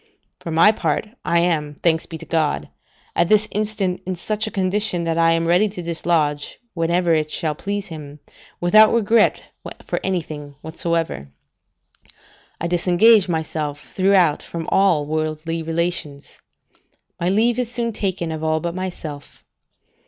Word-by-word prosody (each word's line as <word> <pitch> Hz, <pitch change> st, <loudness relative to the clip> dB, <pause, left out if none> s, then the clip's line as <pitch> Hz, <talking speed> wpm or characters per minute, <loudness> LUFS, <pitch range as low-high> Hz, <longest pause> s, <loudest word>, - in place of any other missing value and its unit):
For -, -, -7 dB
my 165 Hz, +6 st, +6 dB
part, 170 Hz, 0 st, -1 dB
I 170 Hz, 0 st, +2 dB
am, 155 Hz, -4 st, 0 dB
thanks 160 Hz, +1 st, 0 dB
be 165 Hz, -, -7 dB
to -, -, -11 dB
God, 150 Hz, -, -1 dB, 0.5 s
at 170 Hz, -, +2 dB
this 215 Hz, 0 st, +4 dB
instant 205 Hz, -3 st, -2 dB
in 185 Hz, -, -1 dB
such 215 Hz, +5 st, -3 dB
a -, -, -2 dB
condition, 190 Hz, -2 st, -1 dB
that 165 Hz, -1 st, -1 dB
I 165 Hz, 0 st, +4 dB
am 165 Hz, 0 st, 0 dB
ready 180 Hz, +5 st, +3 dB
to 185 Hz, -3 st, -7 dB
dislodge, 160 Hz, -3 st, -1 dB, 0.2 s
whenever 170 Hz, 0 st, +1 dB
it 155 Hz, -1 st, +1 dB
shall 155 Hz, -1 st, -1 dB
please 200 Hz, +5 st, -4 dB
Him, 150 Hz, -2 st, -9 dB, 0.4 s
without 215 Hz, +5 st, +6 dB
regret 230 Hz, -1 st, +3 dB, 0.4 s
for -, -, -2 dB
anything 155 Hz, -6 st, -4 dB
whatsoever. 165 Hz, -, -2 dB, 1.3 s
I -, -, -3 dB
disengage 180 Hz, +4 st, +4 dB
myself 155 Hz, -3 st, -3 dB
throughout 185 Hz, -5 st, +3 dB
from 165 Hz, -1 st, -6 dB
all 180 Hz, -7 st, +3 dB
worldly 155 Hz, +2 st, -2 dB
relations; 165 Hz, -3 st, -3 dB, 0.8 s
my 175 Hz, -, 0 dB
leave 225 Hz, +5 st, +2 dB
is 245 Hz, -2 st, -2 dB
soon 235 Hz, -2 st, -2 dB
taken 185 Hz, -5 st, -2 dB
of 160 Hz, 0 st, -5 dB
all 160 Hz, 0 st, +1 dB
but 170 Hz, +1 st, -3 dB
myself. 170 Hz, -6 st, -7 dB
170 Hz, 145 wpm, -21 LUFS, 155-195 Hz, 1.3 s, my